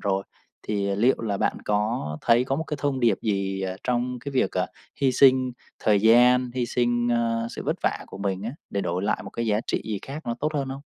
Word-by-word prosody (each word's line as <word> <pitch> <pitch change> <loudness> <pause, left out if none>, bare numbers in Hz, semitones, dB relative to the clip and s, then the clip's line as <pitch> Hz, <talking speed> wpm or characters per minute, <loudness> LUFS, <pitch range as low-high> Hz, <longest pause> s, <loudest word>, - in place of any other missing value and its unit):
rồi, 95 -1 0 0.5
thì 100 -2 0
liệu 120 +5 +4
là 105 -3 -1
bạn - - 0
có 105 -6 -1
thấy 120 +1 +4
có 135 +1 -1
một 160 - -2
cái 150 - -4
thông 140 -2 0
điệp 115 -5 +3
gì, 95 -2 -1
ờ, 95 0 -3
trong 125 0 -1
cái 140 +3 -7
việc, 130 - +2
ờ, - - 0 0.3
hy 135 -2 +3
sinh 130 -1 +5 0.3
thời 105 -2 +3
gian, 125 +3 +5
hy 125 -2 0
sinh, 120 0 +1
ơ, 115 -1 +1
sự - - -6
vất - - 0
vả - - 0
của - - -10
mình 100 -1 -2
á 115 - -3 0.2
để 100 - -1
đổi 90 +1 -2
lại 105 - 0
một 95 - -8
cái 115 0 -3
giá 105 0 +2
trị - - -1
gì 105 -3 -3
khác 140 +1 -8
nó 120 - -1
tốt 155 +1 -1
hơn 135 -2 -1
không? 135 +1 -6
120 Hz, 240 wpm, -25 LUFS, 100-130 Hz, 0.5 s, sinh